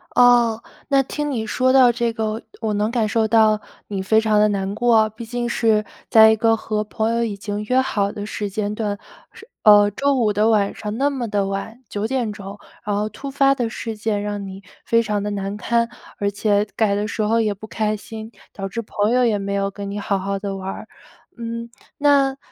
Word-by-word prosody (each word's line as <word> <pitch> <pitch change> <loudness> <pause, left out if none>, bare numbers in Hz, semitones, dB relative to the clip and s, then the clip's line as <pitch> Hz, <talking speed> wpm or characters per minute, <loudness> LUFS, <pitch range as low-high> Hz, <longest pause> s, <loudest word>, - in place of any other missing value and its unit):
哦， 240 -2 +5 0.3
那 275 -1 +3
听 295 +2 -3
你 225 -4 -2
说 255 +4 +1
到 255 -2 +6
这 235 0 -1
个， 220 0 -2 0.2
我 215 -2 -1
能 210 +2 0
感 230 -3 0
受 220 +1 +1
到 215 -1 +4 0.3
你 195 -2 -3
非 220 +3 +3
常 215 -1 +2
地 210 - +5
难 195 -1 -2
过 235 +1 +2
啊， 215 0 +4
毕 220 +2 -9
竟 240 +1 -3
是 220 -3 +2 0.2
在 220 0 +8
一 - - +3
个 225 +1 +3
和 215 -1 -2
朋 220 +2 -1
友 235 0 +1
已 210 -3 -2
经 205 +1 -4
约 255 +3 +2
好 200 -6 -1
的 205 -2 -6
时 210 -1 -4
间 205 +1 -2
段。 210 -2 -2 0.4
是 450 - -14 0.2
呃， 205 -1 +7
周 280 +5 +1
五 225 -4 +2
的 210 +2 +2
晚 205 -2 +2
上 210 +1 -5
那 280 +2 +2
么 255 -4 -3
的 205 -2 0
晚， 225 +6 -5
9 210 +1 -2
点 245 -4 -1
钟， 200 -1 -9 0.3
然 205 -1 -1
后 210 +1 -1
突 275 +4 -8
发 275 0 +3
的 240 -4 -2
事 225 -1 -6
件 210 -1 -1
让 205 -1 -4
你 195 +1 -9 0.2
非 230 0 +3
常 210 -1 -1
地 210 - -2
难 200 0 -3
堪， 235 +1 0 0.3
而 200 0 0
且 205 0 +1
改 210 -3 +2
的 205 +1 -1
时 220 - -3
候 225 +2 +2
也 210 -2 0
不 215 +2 -11
开 215 -1 -1
心， 220 +2 -9 0.2
导 195 -1 -5
致 230 +5 -4
朋 210 0 -1
友 250 0 +3
也 215 -3 +2
没 200 0 -3
有 195 0 0
跟 200 0 -7
你 205 - -4
好 200 -1 0
好 195 +1 -3
的 200 -1 -4
玩。 190 0 -6 0.5
嗯， 230 0 -5 0.3
那 280 -2 +3
215 Hz, 235 characters per minute, -21 LUFS, 205-235 Hz, 0.5 s, 在